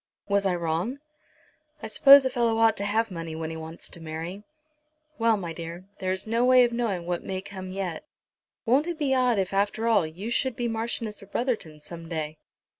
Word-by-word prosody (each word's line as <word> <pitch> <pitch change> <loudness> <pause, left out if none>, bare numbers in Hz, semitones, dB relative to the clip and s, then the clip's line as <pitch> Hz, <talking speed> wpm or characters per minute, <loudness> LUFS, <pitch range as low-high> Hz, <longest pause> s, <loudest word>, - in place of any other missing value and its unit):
Was 200 -1 +2
I 180 - +1
wrong?" 170 - -1 0.9
"I - - -3
suppose 275 +5 +8
a 260 - +1
fellow 235 -2 +1
ought 225 -1 +4
to 200 - -2
have 220 +1 +1
money 165 -2 -5
when 160 0 -4
he - - -5
wants 160 +1 -6
to 170 - -10
marry. 165 +5 -6 0.8
Well, 225 -1 +4
my 170 -4 -5
dear, 170 +2 -7
there 185 0 -1
is 185 - -2
no 230 +2 +1
knowing 240 -7 +3
what 175 0 -2
may 190 -1 -3
come 190 -1 -8
yet. 185 -4 -4 0.6
Won't 265 +7 +3
it 345 -2 -3
be 285 -4 +1
odd, 250 -3 +3
if 190 -1 -1
after 205 +3 0
all, 200 -8 +3
you 190 +9 -6
should 260 0 0
be 240 +1 -1
Marchioness 225 -1 -3
of 200 0 -15
Brotherton 215 - -2
some 165 +1 -9
day? 155 -2 -4
200 Hz, 195 wpm, -26 LUFS, 170-235 Hz, 0.9 s, suppose